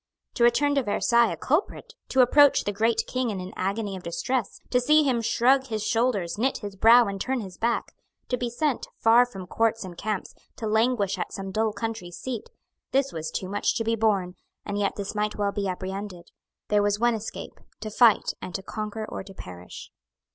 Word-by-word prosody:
To 235 - 0
return 285 +5 +4
to 280 - +2
Versailles 235 +1 +2
a - - -7
culprit; 375 - -1 0.2
to 265 - +4
approach 285 +3 +5
the 205 - -1
great 225 +3 +1
King 255 -1 -1
in 200 -3 -3
an 185 +1 -7
agony 200 +1 -2
of 185 - -7
distress; 225 +8 -2
to 250 - +3
see 305 +4 +5
him 255 -5 +1
shrug 260 +4 +3
his 215 -3 -3
shoulders, 220 -6 0
knit 265 +4 +1
his 205 -2 -7
brow 230 +4 +7
and 195 -2 -4
turn 260 -2 -1
his 190 -3 -8
back; 235 +1 0 0.4
to 250 - +1
be 245 -1 -3
sent, 275 +2 -1
far 235 +2 +5
from 195 -6 -9
courts 225 +4 0
and 180 -2 -8
camps, 210 +1 -4 0.2
to 225 - -6
languish 220 -2 +1
at - - -3
some 195 -1 -6
dull 220 +2 +1
country 220 -3 -5
seat; 225 +7 -6 0.4
this 275 0 +1
was 160 -1 -4
too 185 - -4
much 205 +2 0
to 225 - -1
be 225 +1 +1
borne; 200 -5 +1 0.3
and 205 0 -3
yet 200 -1 0
this 200 -1 -5
might 210 0 -1
well 205 -1 0
be 200 -1 -2
apprehended. 185 -1 -6 0.4
There 210 0 +3
was 205 0 +1
one 240 +1 +3
escape; 220 -1 -7 0.2
to 215 0 -5
fight, 230 0 +4
and 185 - -7
to 195 - -4
conquer 215 +1 -5
or - - -6
to 195 0 -12
perish. 90 - -10
220 Hz, 205 wpm, -26 LUFS, 195-240 Hz, 0.4 s, brow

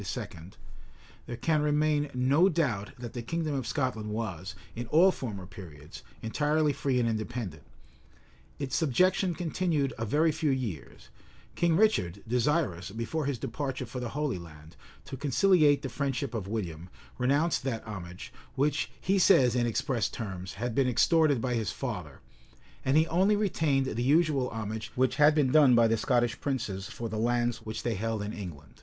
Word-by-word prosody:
[] 90 -2 -10
there 120 - -5
can 155 +4 +1
remain 150 0 +1
no 140 +9 +4
doubt 125 - -1
that 120 -1 -7
the 120 - -4
kingdom 155 +5 -2
of 130 -5 -2
Scotland 125 -4 -2
was, 95 -4 -4 0.2
in 120 +1 -5
all 175 +8 +5
former 105 - -6
periods, 80 -5 -11 0.2
entirely 150 +5 +1
free 130 -2 0
and 120 - +1
independent. 110 -7 -3 1.0
Its 140 -2 -3
subjection 180 +4 +2
continued 160 -5 -1
a - - -1
very 155 +7 +3
few 155 0 -1
years: 115 - -4 0.4
King 170 -2 +2
Richard, 100 - +2
desirous, 125 - 0
before 115 +8 -3
his 140 -3 -1
departure 130 +3 -4
for 125 - -6
the 120 -2 -4
Holy 145 -6 -2
Land, 80 -1 -13 0.3
to 135 - -6
conciliate 150 +2 +3
the - - -2
friendship 135 -1 -2
of 105 -5 -4
William, 90 -5 -4 0.3
renounced 140 +6 +2
that 115 -4 -2
homage, 95 +2 -8 0.2
which, 145 +2 0
he 195 +1 +1
says 125 -8 +5
in 120 -1 +2
express 120 -1 0
terms, 95 -4 -6
had 120 +3 -3
been 135 +2 +2
extorted 150 +2 +3
by 125 +1 -1
his 115 -2 -1
father; 90 - -6 0.6
and 135 +3 +3
he 160 - +5
only 190 +6 +3
retained 160 -10 +1
the 120 -2 -3
usual 145 -1 +2
homage 110 -1 -5
which 130 0 +1
had 150 +1 +6
been 140 -4 +2
done 145 -5 +6
by 115 -1 +5
the 115 - +2
Scottish 120 +1 0
princes 105 -8 -3
for 115 - -5
the 110 -1 -4
lands 120 0 +1
which 110 -1 -6
they 120 - 0
held 110 +1 -2
in 105 - -5
England. 80 -8 -9
125 Hz, 170 wpm, -29 LUFS, 110-150 Hz, 1.0 s, had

